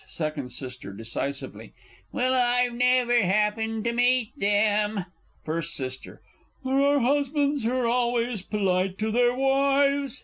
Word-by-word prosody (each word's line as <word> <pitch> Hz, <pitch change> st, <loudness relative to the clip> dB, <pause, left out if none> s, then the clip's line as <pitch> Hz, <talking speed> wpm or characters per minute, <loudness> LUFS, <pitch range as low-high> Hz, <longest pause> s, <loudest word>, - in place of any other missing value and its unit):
Second 155 Hz, -4 st, -4 dB
S. 125 Hz, +1 st, -7 dB
(decisively). 115 Hz, +6 st, -6 dB, 0.4 s
Well, 255 Hz, 0 st, 0 dB
I've 245 Hz, -1 st, +2 dB
never 245 Hz, 0 st, +3 dB
happened 215 Hz, +3 st, 0 dB
to 235 Hz, -, 0 dB
meet 245 Hz, -1 st, +1 dB
them! 205 Hz, -3 st, +1 dB, 0.4 s
First 165 Hz, 0 st, -3 dB
S. 130 Hz, -1 st, -4 dB
There -, -, -13 dB, 0.5 s
are 275 Hz, +2 st, +3 dB
husbands 285 Hz, 0 st, +1 dB
who're 250 Hz, +1 st, 0 dB
always 240 Hz, -2 st, 0 dB
polite 190 Hz, -2 st, -1 dB
to 215 Hz, +1 st, -2 dB
their 245 Hz, +1 st, +2 dB
wives. 275 Hz, 0 st, +1 dB
235 Hz, 125 wpm, -25 LUFS, 195-255 Hz, 0.5 s, never